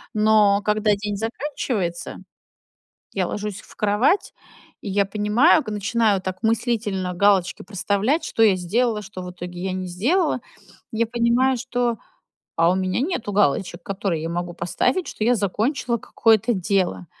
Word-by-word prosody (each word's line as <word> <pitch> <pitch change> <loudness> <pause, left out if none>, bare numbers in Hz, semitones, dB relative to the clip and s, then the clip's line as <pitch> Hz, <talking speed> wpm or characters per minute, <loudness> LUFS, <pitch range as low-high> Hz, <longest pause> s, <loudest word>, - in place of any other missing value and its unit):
но 210 -1 +4
когда 210 0 +2
день 205 0 -4
заканчивается, 225 - -3 1.0
я 185 -2 0
ложусь 205 -1 -4
в - - -18
кровать, 215 - +1 0.5
и 205 - -6
я 200 +1 +2
понимаю, 215 - +3
к 215 - -6
начинаю 210 -1 +1
так 185 +3 -6
мыслительно 215 -5 0
галочки 195 -1 +2
проставлять: 205 - 0
что 225 - +1
я 200 -4 +5
сделала, 210 +5 0
что, 190 -2 -8
в 180 - -7
итоге, 180 0 -8
я 190 -1 -2
не 185 -1 -4
сделала. 265 - +1 0.5
Я 225 +1 0
понимаю, 240 +2 +2
что, 245 -2 -1 0.6
а 165 +1 +4
у - - +1
меня 185 +3 -1
нету 285 - -2
галочек, 175 -2 +1
которые 190 -5 -2
я 165 - -3
могу 175 0 -3
поставить, 250 - 0
что - - -6
я 240 +2 +3
закончила 235 - -1
какое-то 225 +2 +2
дело. 185 - 0
210 Hz, 150 wpm, -22 LUFS, 185-235 Hz, 1.0 s, я